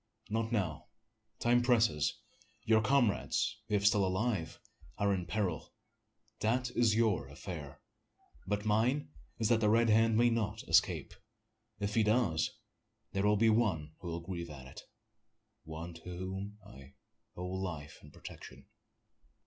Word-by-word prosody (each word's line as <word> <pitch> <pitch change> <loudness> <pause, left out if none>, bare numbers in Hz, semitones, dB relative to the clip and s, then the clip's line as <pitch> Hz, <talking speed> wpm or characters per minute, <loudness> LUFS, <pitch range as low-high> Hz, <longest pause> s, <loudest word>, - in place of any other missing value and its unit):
"Not 110 +1 -1
now 85 -9 -1 0.5
time 120 +1 +3
presses. 115 - +2 0.5
Your 110 -2 +4
comrades, 110 -3 +1
if 100 -1 +1
still 105 -1 +5
alive, 95 -2 -1 0.4
are 100 0 +2
in 90 -2 -3
peril. 95 -7 -2 0.6
That 125 +3 0
is 115 -3 +3
your 110 -11 +2
affair; 70 0 -8 0.7
but 105 +1 -1
mine 115 - +1 0.3
is 110 - 0
that 115 -2 +4
the 105 -2 +3
Red 115 +1 +4
Hand 115 0 +4
may 120 +1 +4
not 110 -2 -1
escape. - - +2 0.7
If 100 0 -2
he 115 - +3
do, 110 -5 +2 0.8
there's 95 - -1 0.3
one 95 -10 +1
will 85 -1 -4
grieve 85 -1 -5
at 70 -3 -10
it 65 - -10 0.8
one 80 +2 -7
to 85 - -13 0.2
whom 95 +3 -5
I 70 +1 -14 0.4
owe 90 - -5
life 90 -5 -5
and 75 - -15
protection." - - -11
105 Hz, 135 wpm, -33 LUFS, 85-115 Hz, 0.8 s, still